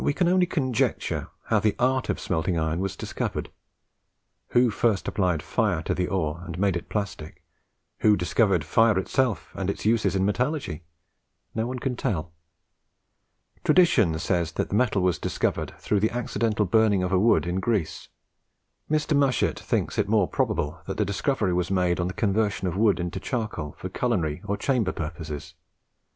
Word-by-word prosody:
We 145 - +2
can 175 +3 +1
only 180 0 +3
conjecture 130 -9 -1 0.2
how - - +2
the 105 -2 +1
art 130 +1 +1
of - - -1
smelting 85 0 -1
iron 80 +1 0
was 95 0 -2
discovered. - - -4 1.0
Who 120 -1 +3
first 105 -3 +1
applied 90 -6 0
fire 95 -1 0
to - - -1
the 90 -1 -1
ore, 85 -4 -2
and 85 -1 -7
made 95 -1 +1
it 85 - -5
plastic; 100 -7 -5 0.6
who 105 -1 +4
discovered 90 0 +2
fire 115 -3 +3
itself, 120 +4 0
and 95 -1 -3
its 100 - -4
uses 110 -2 +2
in 95 0 +2
metallurgy? 125 - -1 0.7
No 110 +1 -1
one 130 +1 -4
can 125 0 -2
tell. 85 -8 -2 1.3
Tradition 115 - +4
says 85 -1 -1
that - - -2
the - - -1
metal 105 -5 +2
was 90 -2 +1
discovered - - -2
through 105 - 0
the 110 +2 +2
accidental 115 -3 0
burning 105 -1 +3
of 90 - -1
a 95 - +3
wood 115 -1 +4
in 90 +2 -1
Greece. 100 -6 -1 0.8
Mr. 155 0 +1
Mushet 140 -3 +2
thinks - - -1
it - - +1
more 105 -4 +3
probable 90 - -1
that 95 - -4
the 105 - +2
discovery 100 -1 0
was 90 0 0
made 90 -2 +1
on 90 - 0
the 95 - -4
conversion 105 -2 0
of 90 - -2
wood 105 -1 +3
into 85 -1 -3
charcoal 105 - -4
for 95 - -5
culinary 95 -7 -1
or 100 0 -1
chamber 120 -9 0
purposes. 80 -2 -6
100 Hz, 170 wpm, -26 LUFS, 90-115 Hz, 1.3 s, who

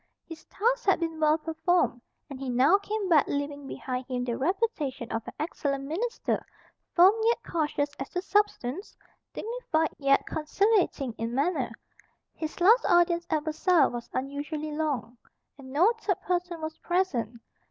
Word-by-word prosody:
His 325 -1 -10
task 485 +4 0
had 390 - +4
been 325 -2 -3
well 310 0 +4
performed; 320 -4 0 0.3
and 275 -3 -8
he 270 -1 -4
now 265 +11 +4
came 410 0 -3
back, 320 -5 +4
leaving 285 0 -3
behind 255 -1 -5
him 250 -2 -2
the 240 -2 -2
reputation 300 - -1
of 225 - -1
an - - -7
excellent 285 -3 -2
minister, 410 - -2 0.5
firm 365 +3 +8
yet 470 +1 +2
cautious 295 -3 -1
as 270 - -5
to 360 - -2
substance, 395 - -1 0.3
dignified 430 -9 -2
yet 275 -1 +3
conciliating 320 - +1
in 230 +1 -3
manner. 280 -3 0 0.6
His 315 +2 -6
last 435 +8 +6
audience 345 0 +3
at 310 -1 0
Versailles 315 -1 +3
was 240 -1 -6
unusually 290 +3 -4
long; 265 -7 -2 0.4
and 260 -1 -11
no 355 - +4
third 395 -5 -1
person 350 -2 -2
was 315 0 -5
present. 255 - -1
315 Hz, 150 wpm, -28 LUFS, 275-360 Hz, 0.6 s, firm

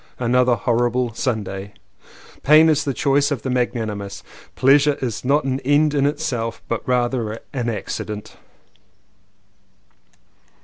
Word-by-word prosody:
Another 125 0 +2
horrible 120 +1 0
Sunday. 100 -5 -3 0.7
"Pain 155 +3 +6
is 150 -2 +1
the 140 - 0
choice 140 0 +2
of 140 -6 -3
the 130 - -2
magnanimous." 110 -5 -3 0.3
"Pleasure 140 +2 +4
is 120 -5 -4
not 140 +4 +2
an 130 0 -1
end 145 +3 +2
in 140 -1 +2
itself 135 -7 -3
but 115 - -2
rather 120 -3 0
an 125 -3 -2
accident." 105 0 -5
125 Hz, 120 wpm, -21 LUFS, 115-140 Hz, 0.7 s, Pain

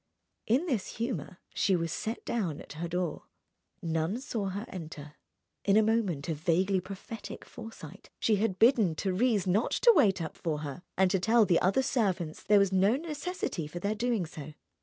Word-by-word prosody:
In 255 +10 +3
this 245 - -2
humour 220 - -3 0.2
she 195 - +2
was 165 -2 -1
set 225 +2 -4
down 185 -11 -2
at - - -10
her 165 +3 -4
door. 175 -1 -3 0.6
None 165 +6 -1
saw 225 -6 -3
her 200 +4 -4
enter. 155 - -8 0.5
In 200 +1 +4
a 220 - +6
moment 210 -10 0
of 160 -3 -2
vaguely 185 +3 +2
prophetic 195 +4 -8
foresight 200 -6 -11
she 215 -2 +2
had 195 -2 0
bidden 220 - +4
Thérèse 200 +3 +1
not 195 +5 +2
to 475 - +6
wait 200 - +4
up 160 -2 -5
for 155 -3 -3
her 145 +2 -6 0.2
and 190 -1 +4
to 190 - +2
tell 225 +3 +4
the 175 -3 +3
other 195 +9 +3
servants 190 - -1
there 210 - +4
was 200 -1 +4
no 195 +4 +4
necessity 305 - -4
for 165 - -8
their 200 +4 -1
doing 225 -3 0
so. 155 -1 -9
195 Hz, 180 wpm, -30 LUFS, 170-225 Hz, 0.6 s, a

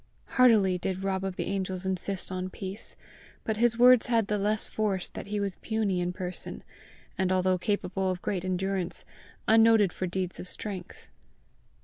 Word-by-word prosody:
Heartily 210 -8 +4
did 190 +1 -3
Rob 190 -1 -1
of 190 -1 -3
the - - -2
Angels 190 -1 -2
insist 190 0 -3
on 185 0 -3
peace, 190 +2 -7 0.5
but 220 -1 -1
his 235 0 +3
words 250 0 +7
had 230 -3 +3
the 210 0 -1
less 210 +2 0
force 200 -4 -1
that - - -7
he 210 0 -2
was 200 -2 -2
puny 215 -5 -1
in 175 0 -1
person, 180 0 -6 0.6
and, 190 -1 +2
although 185 0 +2
capable 190 -1 -1
of 185 -1 -2
great 185 -1 -2
endurance, 185 -1 -2 0.4
unnoted 225 -3 +5
for 185 - -3
deeds 180 0 -3
of - - -6
strength. 190 -2 -6
190 Hz, 165 wpm, -28 LUFS, 185-210 Hz, 0.6 s, words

